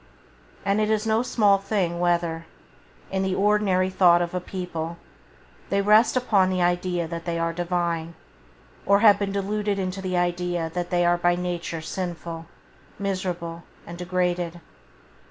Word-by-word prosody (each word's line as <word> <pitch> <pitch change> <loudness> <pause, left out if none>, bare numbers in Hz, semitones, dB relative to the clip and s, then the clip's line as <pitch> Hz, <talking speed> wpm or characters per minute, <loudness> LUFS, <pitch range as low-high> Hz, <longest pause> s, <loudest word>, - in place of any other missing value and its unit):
And 200 +2 +2
it 215 - +1
is 215 0 +1
no 220 +1 +2
small 210 -5 +3
thing 190 -4 -1
whether, 170 -2 0 0.6
in 190 0 0
the 190 -1 0
ordinary 195 -2 +2
thought 180 -2 +5
of 175 0 -2
a 180 - 0
people, 170 -3 -5 0.7
they 200 - +1
rest 215 +5 +4
upon 200 -7 +3
the 185 -1 -1
idea 175 -1 0
that 170 0 -6
they 170 -1 -2
are 165 0 -1
divine, 170 -1 -2 0.7
or 200 0 +5
have 210 -3 +7
been 200 -1 -1
deluded 205 +1 -1
into 190 0 -3
the 185 -1 -2
idea 175 -1 -1
that 175 -1 -3
they 175 -1 +2
are 175 0 +3
by 175 0 +3
nature 175 -2 -3
sinful, 170 -1 -5 0.5
miserable 180 -4 -3 0.2
and 170 0 -9
degraded. 180 -1 -1
180 Hz, 155 wpm, -24 LUFS, 170-195 Hz, 0.7 s, have